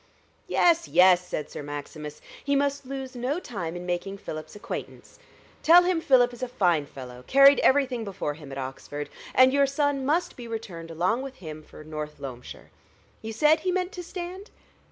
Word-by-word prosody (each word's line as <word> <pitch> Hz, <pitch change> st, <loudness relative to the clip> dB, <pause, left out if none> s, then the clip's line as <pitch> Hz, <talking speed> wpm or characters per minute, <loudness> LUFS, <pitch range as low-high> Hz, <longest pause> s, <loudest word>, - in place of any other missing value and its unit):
"Yes, 340 Hz, -1 st, +3 dB
yes!" 180 Hz, 0 st, +6 dB
said 150 Hz, -, -4 dB
Sir -, -, -6 dB
Maximus; 145 Hz, +1 st, -7 dB, 0.2 s
"he 280 Hz, 0 st, +1 dB
must 280 Hz, -1 st, 0 dB
lose 265 Hz, -1 st, -6 dB
no 255 Hz, +7 st, -1 dB
time 175 Hz, -, -5 dB
in 175 Hz, 0 st, -6 dB
making 180 Hz, +3 st, -3 dB
Philip's 155 Hz, -3 st, -8 dB
acquaintance. 210 Hz, -, -8 dB, 0.4 s
Tell 345 Hz, +3 st, +7 dB
him 355 Hz, -2 st, +1 dB
Philip 245 Hz, -4 st, +4 dB
is 240 Hz, -, -11 dB
a 255 Hz, -, -1 dB
fine 175 Hz, -, +1 dB
fellow 125 Hz, -2 st, -10 dB
carried 275 Hz, +1 st, +7 dB
everything 265 Hz, -4 st, +3 dB
before 195 Hz, -7 st, -3 dB
him 145 Hz, -2 st, -12 dB
at 135 Hz, -, -6 dB
Oxford. 135 Hz, +2 st, -6 dB, 0.3 s
And 255 Hz, 0 st, +6 dB
your 280 Hz, 0 st, +4 dB
son 280 Hz, 0 st, 0 dB
must 315 Hz, +6 st, 0 dB
be 240 Hz, -2 st, -9 dB
returned 190 Hz, -8 st, -6 dB
along 180 Hz, +9 st, 0 dB
with 270 Hz, -1 st, -7 dB
him 155 Hz, -3 st, -8 dB
for 155 Hz, -, -13 dB
North 150 Hz, -1 st, -6 dB
Loamshire. 125 Hz, -3 st, -9 dB, 0.5 s
You 225 Hz, -, -5 dB
said 300 Hz, +7 st, +4 dB
he 370 Hz, -, -1 dB
meant 365 Hz, 0 st, -1 dB
to 360 Hz, -, -7 dB
stand?" 360 Hz, +3 st, -7 dB
235 Hz, 180 wpm, -26 LUFS, -, 0.5 s, Tell